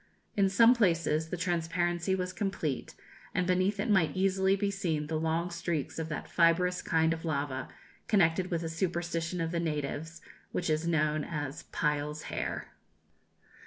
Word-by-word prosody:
In 195 -1 +3
some 230 +5 +7
places 165 -8 +2
the 180 - -3
transparency 175 +1 0
was 180 -1 -3
complete, 175 -7 -2 0.4
and 180 - +2
beneath 185 +3 +1
it 205 - 0
might 185 -7 +3
easily 190 0 +3
be 200 0 0
seen 165 -6 -1
the 155 +1 -2
long 165 +2 0
streaks 165 -4 -2
of 160 0 -3
that 155 - -4
fibrous 180 +2 +3
kind 160 0 +2
of 165 - -6
lava, 140 -4 -2 0.4
connected 185 -3 +3
with 170 -1 -1
a - - -2
superstition 170 0 -2
of 165 0 -1
the 170 - 0
natives, 160 +1 -3 0.3
which 175 -3 -1
is 155 +2 0
known 155 -2 +1
as 145 -2 -4
"Pile's 150 0 -1
hair." - - -3
170 Hz, 160 wpm, -30 LUFS, 160-185 Hz, 0.4 s, some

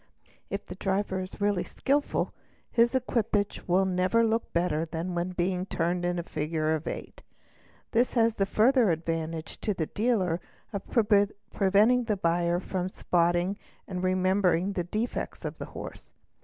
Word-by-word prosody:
If 200 +1 -4
the - - -7
driver 190 0 -1
is 185 +2 -7
really 205 -3 +1
skilful 285 +2 0 0.4
his 235 +2 +3
equipage 220 -5 0
will 185 +2 +3
never 185 +5 +2
look 225 +1 0
better 170 -2 +1
than 165 +2 -4
when 175 +1 -1
being 180 +1 -1
turned 175 0 0
in 175 0 0
a 170 - -2
figure 155 0 -1
of 160 0 -3
eight; - - -6 0.7
this 240 +3 +2
has 230 -1 +4
the 195 -2 0
further 235 +2 +4
advantage 165 -1 -2
to 210 - -1
the 160 - -1
dealer 195 -5 0 0.3
of 200 - -2
preventing 205 +1 +3
the 215 -3 0
buyer 170 0 +1
from 185 0 -3
spot 175 -2 +1
ing 185 +4 -1 0.3
and 180 -2 -4
remembering 185 0 +2
the 175 - -1
defects 215 +7 -3
of - - -5
the - - -4
horse. - - -9
185 Hz, 155 wpm, -28 LUFS, 175-210 Hz, 0.7 s, has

